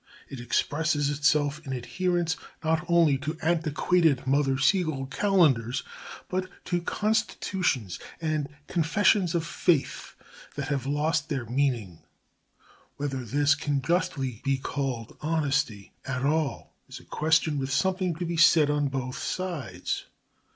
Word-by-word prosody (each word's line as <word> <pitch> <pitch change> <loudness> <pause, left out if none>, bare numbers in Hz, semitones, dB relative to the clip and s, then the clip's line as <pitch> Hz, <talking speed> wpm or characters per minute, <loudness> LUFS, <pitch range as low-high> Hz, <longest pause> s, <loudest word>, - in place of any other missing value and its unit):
It 135 - -7
expresses 145 +4 0
itself 145 +1 +1
in 135 - -5
adherence 170 +7 -1 0.3
not 160 +2 +1
only 165 -5 +4
to 155 +3 -4
antiquated 160 -3 +2
Mother 135 0 +2
Seigel 150 -1 +1
calendars 140 - +2 0.4
but 185 0 -2 0.2
to 175 -1 0
constitutions 190 - -1 0.2
and 155 -3 -1 0.2
confessions 175 +2 +2
of 165 -1 0
faith 170 -3 0 0.4
that 140 -1 -4
have 135 -3 -1
lost 150 +1 0
their 135 -6 -2
meaning. 120 - -1 1.0
Whether 135 -3 -3
this 145 +5 +3
can 145 -2 -1
justly 135 - -1
be 135 0 +1
called 130 -4 -4
honesty 150 -9 -1
at 130 0 -2
all 155 -1 -1 0.2
is - - -8
a - - -18
question 155 -1 +1
with 135 +1 -3
something 185 +2 +1
to 175 +2 -4
be 170 0 -3
said 160 -3 +6
on 145 -1 +1
both 130 -1 -4
sides. 145 - -3
145 Hz, 130 wpm, -27 LUFS, 135-165 Hz, 1.0 s, said